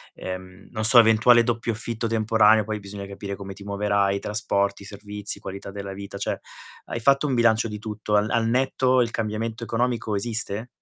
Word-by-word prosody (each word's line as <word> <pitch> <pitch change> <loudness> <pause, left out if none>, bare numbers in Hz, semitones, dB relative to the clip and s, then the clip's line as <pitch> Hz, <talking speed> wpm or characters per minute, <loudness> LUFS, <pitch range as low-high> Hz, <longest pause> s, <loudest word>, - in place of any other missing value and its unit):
ehm, 95 +1 -8
non 110 - -3
so, 120 +3 +8
eventuale 115 +1 +6
doppio 115 0 -1
affitto 115 +1 -3
temporaneo, 110 -1 +3
poi 110 -1 -3
bisogna 100 0 -8
capire 100 0 -6
come 95 -1 -8
ti 100 - -13
muoverai, 100 -1 0
trasporti, 100 -1 -1
servizi, 105 0 -5
qualità 100 +1 -8
della 100 -1 -6
vita. 100 0 -8
Cioè, - - -3 0.5
hai 115 - -4
fatto 140 +4 +3
un 135 - 0
bilancio 115 -1 +3
di 105 -1 -6
tutto: 105 -1 -3
al 105 +1 +2
al 115 -1 +1
netto 130 +1 +2
il 115 - 0
cambiamento 110 +1 -3
economico 115 -1 -1
esiste? 110 +1 -1
110 Hz, 175 wpm, -24 LUFS, 100-115 Hz, 0.5 s, so